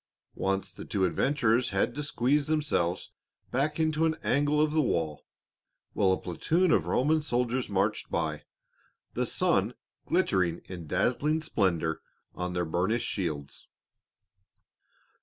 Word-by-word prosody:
Once 95 0 -2
the - - -9
two 95 -2 0
adventurers 120 - +2
had - - 0
to 145 - -4
squeeze 145 0 +1
themselves 145 - 0 0.4
back 150 +4 0
into 155 0 +1
an 160 -1 +2
angle 145 +2 +2
of 155 0 +3
the 155 0 +3
wall, 80 - -1 0.7
while 95 -2 +3
a 95 - +2
platoon 165 - +1
of - - +2
Roman 155 +4 +2
soldiers 125 -3 -1
marched 100 +2 0
by, 80 -2 -2 0.7
the - - -1
sun - - +1 0.3
glittering 85 -3 +1
in 85 -4 -8
dazzling 130 - +1
splendor 85 - 0 0.3
on 90 0 -4
their 90 -1 0
burnished 95 +8 0
shields. 75 -7 -4
115 Hz, 130 wpm, -29 LUFS, 90-150 Hz, 0.7 s, of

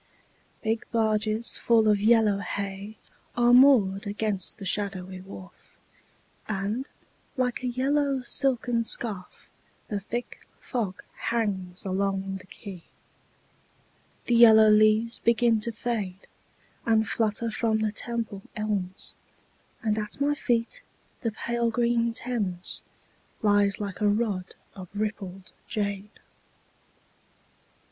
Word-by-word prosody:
Big 225 0 0
barges 220 0 +1
full 225 -2 +3
of 210 -1 +3
yellow 215 -2 +4
hay 200 +1 -5 0.4
Are 240 0 +5
moored 225 -7 +5
against 205 -2 -2
the 200 - -8
shadowy 190 -2 -2
wharf, 190 0 -13 0.7
And, 215 +6 -2 0.5
like 250 -1 0
a 250 - -2
yellow 270 +2 +1
silken 245 -2 +1
scarf, 210 -5 -2 0.4
The 205 - -1
thick 235 +5 -6
fog 215 -8 -3
hangs 195 -6 -2
along 195 0 -1
the 185 0 -15
quay. 190 -4 -9 1.4
The 240 - +1
yellow 220 -2 +8
leaves 215 +2 +4
begin 235 -1 +3
to 230 +2 -2
fade 210 -5 -4 0.6
And 220 -2 +2
flutter 225 +1 0
from 220 0 0
the 215 -1 +1
Temple 225 -2 -4
elms, 205 -4 -3 0.7
And 215 -1 +1
at 210 +3 -6
my 285 +1 +2
feet 235 -5 -1 0.4
the 230 - -1
pale 235 +2 -1
green 235 0 +1
Thames 205 -9 -3 0.6
Lies 205 -1 +3
like 200 -2 -5
a 210 - +4
rod 205 -4 -1 0.2
of 185 -2 -9
rippled 195 -3 -4 0.2
jade. 205 -1 -3
215 Hz, 110 wpm, -27 LUFS, 200-235 Hz, 1.4 s, yellow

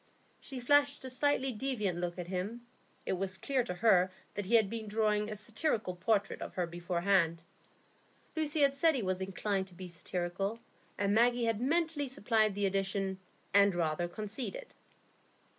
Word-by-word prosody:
She 265 -2 -7
flashed 285 +2 +3
a 260 - -3
slightly 270 0 +1
defiant 215 -7 -2
look 175 0 -3
at 180 - -4
him; 195 +7 -4 0.4
it - - 0
was 190 0 -2
clear 265 +4 0
to 180 - -4
her 185 -2 +4 0.2
that 205 -2 -4
he 235 - +4
had 220 -3 +5
been 220 +1 -5
drawing 210 0 +1
a 215 - -4
satirical 215 - -1
portrait 200 +2 0
of - - -6
her 180 - 0
beforehand. 170 0 +1 0.9
Lucy 310 -1 0
had 280 -1 +5
said 315 +3 +3
he 245 - -1
was 185 0 -1
inclined 195 0 -1
to 180 - -16
be 185 +1 -7
satirical, 180 +5 -3 0.4
and 200 0 +1
Maggie 240 +2 +4
had 225 -1 0
mentally 315 +1 +1
supplied 220 -5 +1
the 205 0 0
addition, 195 0 -1 0.3
"and 200 -2 +5
rather 170 0 0
conceited." 220 - -5
205 Hz, 165 wpm, -32 LUFS, 185-245 Hz, 0.9 s, had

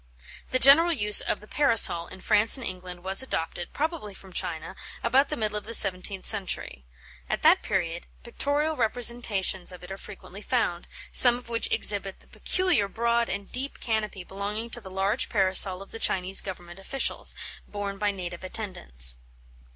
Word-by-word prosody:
The 255 - +1
general 295 +6 +6
use 210 -9 +5
of - - -2
the 210 - -15
Parasol 230 -12 +3
in 185 - -13
France 215 +5 +2
and 260 - -6
England 180 -2 -7
was 190 +3 +1
adopted, 175 -8 -4
probably 295 - -4
from 190 -1 -11
China, - - -3 0.3
about 275 +2 +2
the - - -3
middle 215 -2 -1
of - - -18
the 230 +1 +2
seventeenth 190 0 +4
century. 185 - -1 0.4
At - - -3
that - - +5
period, 175 -2 -3 0.2
pictorial 290 +6 -1
representations 225 -6 +1
of 180 0 -13
it 180 - -10
are 195 - -6
frequently 200 -1 -11
found, 215 -8 -2 0.2
some 245 -1 +7
of 245 -1 -12
which 230 -1 -1
exhibit 200 -2 +1
the - - -21
peculiar 365 - 0
broad 235 +2 -1
and 195 +1 -5
deep 265 +3 -4
canopy 215 -4 -3
belonging 205 +5 -5
to 240 - -1
the 190 - -11
large 195 +2 -1
Parasol 190 0 +3
of 195 - -19
the 225 - -8
Chinese 190 -1 +1
Government 175 -2 -9
officials, 270 +8 -2 0.3
borne 200 -1 -6
by 210 -1 0
native 180 -3 -7
attendants. 65 - -1
205 Hz, 170 wpm, -26 LUFS, 185-235 Hz, 0.4 s, some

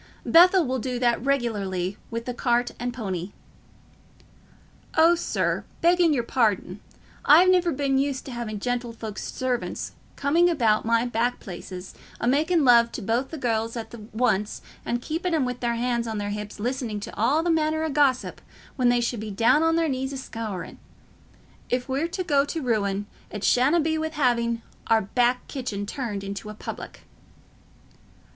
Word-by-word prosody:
"Bethell 360 +1 +6
will 260 0 -1
do 250 +1 -3
that 240 -1 +1
regularly 205 -9 -1
with 230 0 -4
the 250 - -3
cart 240 0 +1
and 245 0 -2
pony." 195 -6 -4 1.6
"Oh, 325 +2 +7
sir, 345 - -1 0.2
begging 345 -1 +4
your 255 -5 +1
pardon, 210 -6 0 0.4
I've 345 +6 +7
never 360 -2 +3
been 270 -1 +1
used 275 -1 -1
t' 265 - -7
having 235 -3 -4
gentlefolks's 230 -2 -4
servants 255 -2 -3 0.2
coming 330 +5 +3
about 225 -11 +2
my 230 +1 +2
back 240 +1 0
places, 185 0 -8 0.3
a - - -2
making 310 +5 +3
love 235 -2 +6
to 235 - -5
both 235 +6 0
the 320 - -6
gells 230 -3 -1
at 225 0 -7 0.2
once 215 -3 0 0.2
and 240 +1 -2
keeping 330 +2 -1
'em 295 -5 +1
with 250 0 -4
their 235 -1 0
hands 235 0 -1
on 220 -1 -3
their 205 0 -3
hips 210 0 -6
listening 240 -2 -2
to - - -7
all 270 +9 +2
manner 315 -2 +1
o' 320 - -1
gossip 275 -3 +1 0.4
when 250 -2 +3
they 245 0 +3
should 235 -1 -1
be 215 0 -5
down 230 +8 +3
on 325 0 +3
their 330 -1 +2
knees 265 -1 -2
a 275 - -5
scouring. 225 -7 -6 0.9
If 250 0 -1
we're 275 +5 0
to 370 +2 -3
go 285 -5 +3
to 305 +3 -4
ruin, 205 -4 0 0.2
it 210 -1 -6
shanna 270 +7 +4
be 315 0 0
wi' 315 0 -1
having 235 -6 0 0.2
our 225 -1 +4
back 245 +4 +1
kitchen 230 -7 -4
turned 210 -4 -4
into 200 +2 -6
a 215 - -8
public." - - -8
245 Hz, 170 wpm, -25 LUFS, 225-285 Hz, 1.6 s, Oh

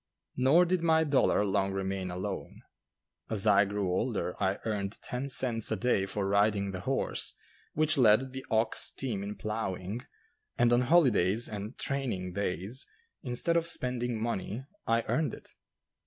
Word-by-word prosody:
Nor 140 +8 +5
did 180 0 0
my 160 -1 +4
dollar 140 -8 +3
long 95 0 0
remain 95 -1 -2
alone. 95 +2 -5 0.7
As 110 -2 +1
I 100 -1 +5
grew 100 -2 -2
older 95 -2 -1
I 95 0 +1
earned 105 -2 -2
ten 125 +3 -4
cents 120 -5 +1
a - - +2
day 100 -3 +1
for 100 +1 -2
riding 100 0 +2
the 95 - -5
horse - - -2 0.4
which 155 0 +2
led 125 +3 +4
the 130 0 -6
ox 110 -1 +2
team 115 -7 -3
in 100 +1 -5
ploughing, 105 0 -4 0.6
and 120 0 +4
on 120 - +4
holidays 120 - +3
and 105 +3 -6
"training 115 -10 -2
days," 100 +5 -3 0.3
instead 130 +5 -1
of 170 0 +2
spending 125 -6 -1
money, 115 +2 -3 0.2
I 115 0 +2
earned 160 -1 -1
it. - - -15
110 Hz, 155 wpm, -30 LUFS, 100-130 Hz, 0.7 s, Nor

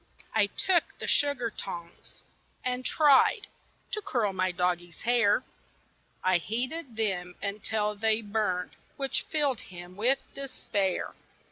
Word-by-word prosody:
I 215 -2 +4
TOOK 345 - +1
the - - -5
sugar 280 -6 +2
tongs, 170 -3 -8 0.4
and 250 0 -1
tried 300 - +5 0.5
To 425 - -2
curl 235 - 0
my 185 0 +1
doggie's 175 -1 -1
hair; 235 -1 +3 0.8
I 185 -1 +4
heated 250 - -3
them 180 -5 -1
until 210 +1 -1
they 220 +1 +1
burned, 205 -4 -1 0.3
Which 275 -1 -1
filled 285 -7 +1
him 175 0 -10
with 245 +7 +3 0.2
despair. 205 -8 -2
215 Hz, 120 wpm, -29 LUFS, 185-255 Hz, 0.8 s, tried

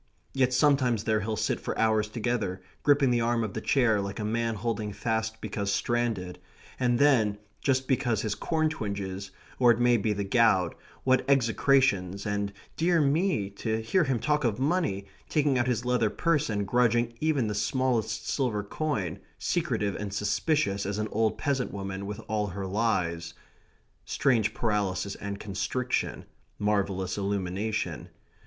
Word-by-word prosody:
Yet 130 -2 +2
sometimes 130 -4 +3
there 110 -1 +2
he'll 110 +1 -2
sit - - -1
for - - -4
hours 110 -1 +2
together, 110 -4 -2 0.2
gripping 140 -3 +4
the 120 -1 +2
arm 115 0 +1
of 105 -3 -4
the 110 - -4
chair, 115 -6 +3
like 100 0 -5
a 105 - -2
man 115 +1 0
holding 110 -1 -2
fast 110 0 -2
because 100 -1 -2
stranded, 100 -3 -1 0.4
and 120 -2 +2
then, 120 -8 +4 0.2
just 130 -2 +1
because 120 -5 +1
his 110 -2 0
corn 155 - 0
twinges, 100 -8 -4 0.3
or 125 -2 +6
it 120 0 +4
may 120 0 +4
be 110 0 0
the 100 -1 -1
gout, 100 -4 +3 0.3
what 130 0 +3
execrations, 115 -7 +2
and, 100 -1 -1 0.2
dear 170 +1 +2
me, 145 - +1
to 110 +2 -2
hear 115 +12 +2
him 135 -3 +1
talk 150 +6 0
of 115 -4 +1
money, 140 - 0 0.2
taking 145 -4 +2
out 120 - +1
his 120 -1 0
leather 125 -3 +2
purse 150 +3 +1
and 100 -2 -1
grudging 120 +1 +2
even 155 -6 +1
the 105 - -1
smallest 110 0 0
silver 120 -7 0
coin, 100 - -2 0.2
secretive 120 - -1
and 100 -1 -5
suspicious 105 - 0
as 100 +1 -2
an 110 0 -2
old 110 0 +1
peasant 135 -3 -1
woman 95 0 -5
with 105 +1 -5
all 105 -1 0
her 95 +1 -5
lies. 90 -5 -1 0.7
Strange 115 -4 +1
paralysis 100 -4 -1
and 100 0 -6
constriction 125 +5 -2 0.3
marvellous 100 -2 0
illumination. 100 +2 -2
110 Hz, 160 wpm, -28 LUFS, 100-125 Hz, 0.7 s, or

